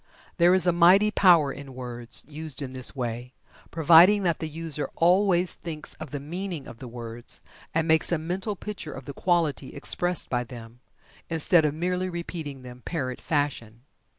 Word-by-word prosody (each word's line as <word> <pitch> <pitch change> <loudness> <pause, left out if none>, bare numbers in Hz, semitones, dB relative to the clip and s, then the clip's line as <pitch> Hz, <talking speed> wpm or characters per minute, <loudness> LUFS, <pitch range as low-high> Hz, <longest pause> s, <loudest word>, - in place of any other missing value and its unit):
There 175 +1 +5
is 185 -2 +2
a 175 - +4
mighty 180 +5 +5
power 170 -9 +4
in 140 -1 -10
words, 120 -1 -5
used 155 -1 -6
in 130 -1 -7
this 130 +1 -2
way, 120 0 -5 0.4
providing 170 +5 +6
that 170 -3 0
the 160 - -4
user 155 -1 -3
always 180 +1 +3
thinks 155 -3 -7
of - - -7
the 145 - -5
meaning 170 +1 -6
of 115 - -11
the 130 - -8
words, 120 0 -8 0.3
and 165 0 0
makes 160 +1 +4
a 170 - +2
mental 185 +6 -3
picture 200 -6 -7
of 135 - -9
the 140 - -7
quality 165 -5 -1
expressed 175 +5 +2
by 125 -1 -1
them, 120 -1 -12 0.5
instead 165 0 +3
of 150 0 -1
merely 180 +2 -1
repeating 165 -6 -6
them 125 0 -11
parrot 130 -7 -4
fashion. 125 -7 -2
155 Hz, 175 wpm, -26 LUFS, 130-175 Hz, 0.5 s, providing